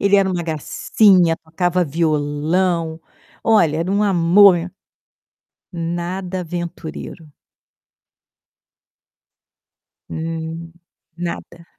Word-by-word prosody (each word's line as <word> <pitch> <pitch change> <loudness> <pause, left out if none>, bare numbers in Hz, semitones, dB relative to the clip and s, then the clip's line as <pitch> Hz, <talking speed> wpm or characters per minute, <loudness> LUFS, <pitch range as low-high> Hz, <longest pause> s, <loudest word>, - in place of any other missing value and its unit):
Ele 200 0 +4
era 195 -1 +2
uma 175 -1 -2
gracinha, 170 +2 +2
tocava 175 +3 -1
violão, 160 +2 0 0.4
olha, 170 -9 +3
era 170 +3 -2
um 200 +1 +1
amor 190 0 +5
e 170 +2 -6 1.0
nada 175 +2 -4
aventureiro. 170 -2 -7 2.8
Hum, 165 +1 -5 0.4
nada. 170 -1 -6
170 Hz, 75 wpm, -19 LUFS, 160-185 Hz, 2.8 s, amor